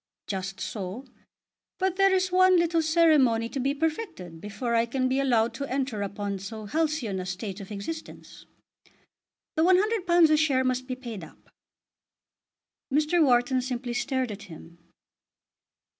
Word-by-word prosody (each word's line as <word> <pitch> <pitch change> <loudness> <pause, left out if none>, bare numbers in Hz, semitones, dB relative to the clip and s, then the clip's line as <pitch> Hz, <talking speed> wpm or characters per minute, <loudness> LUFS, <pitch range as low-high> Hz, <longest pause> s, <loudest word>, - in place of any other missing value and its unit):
"Just 195 -1 -4
so. 205 +5 -5 0.7
But 375 -1 0
there 390 0 +4
is 375 -1 +1
one 370 0 +5
little 335 -1 +2
ceremony 305 -8 +3
to 275 - -4
be 275 +2 0
perfected 300 - -4
before 210 +4 -4
I 230 0 +2
can 255 +2 0
be 260 +1 +1
allowed 235 -4 +2
to 275 +4 -4
enter 260 -5 -2
upon 200 0 -3
so 215 +3 -7
halcyon 295 -6 -1
a 185 - -4
state 190 +1 -5
of 195 - -10
existence. 210 +11 -8 1.1
The 315 - +1
£100 365 -3 +4
a 310 - +5
share 280 -4 +2
must 255 0 -1
be 255 - -3
paid 235 -7 -8
up." 155 - -16 1.4
Mr. 310 +4 +3
Wharton 255 -1 +3
simply 245 -1 -4
stared 255 0 -1
at 205 - -8
him. 170 -1 -13
255 Hz, 145 wpm, -27 LUFS, 210-315 Hz, 1.4 s, one